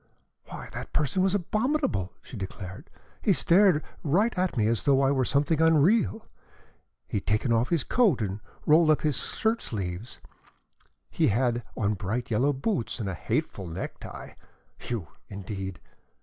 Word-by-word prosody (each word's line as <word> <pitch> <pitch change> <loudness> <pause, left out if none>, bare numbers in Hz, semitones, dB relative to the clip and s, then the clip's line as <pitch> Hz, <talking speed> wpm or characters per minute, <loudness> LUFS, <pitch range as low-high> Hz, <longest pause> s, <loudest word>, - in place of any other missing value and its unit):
"Why, - - -8
that - - -7
person 150 +5 +1
was 190 +1 +2
abominable!" 215 - 0
she - - -10
declared. 95 -2 -7 0.3
"He - - +4
stared 180 -3 +4 0.3
at 185 - +2
me 110 - +3
as 115 +1 +1
though 140 -2 +3
I 135 - +3
were 135 -2 +2
something 145 +5 +1
unreal. 165 +8 +3 0.8
He - - -2
had 100 - -5
taken 110 +3 +2
off 115 +2 +2
his 170 -5 +1
coat 215 - +3
and 100 -2 -2 0.3
rolled 155 0 +5
his 150 -5 +1
shirt 225 +1 0
sleeves 95 +1 -5
up. - - -22 0.8
He - - +2
had 120 +2 +1 0.2
on 105 -1 +1
bright 110 +5 -3
yellow 125 +7 +3
boots 140 - -2
and 105 - -3
a 95 - -2
hateful 90 +2 -2
necktie. 85 +3 -7 0.6
You, 110 -10 -3 0.2
indeed! 95 -2 -6
130 Hz, 150 wpm, -27 LUFS, 105-170 Hz, 0.8 s, rolled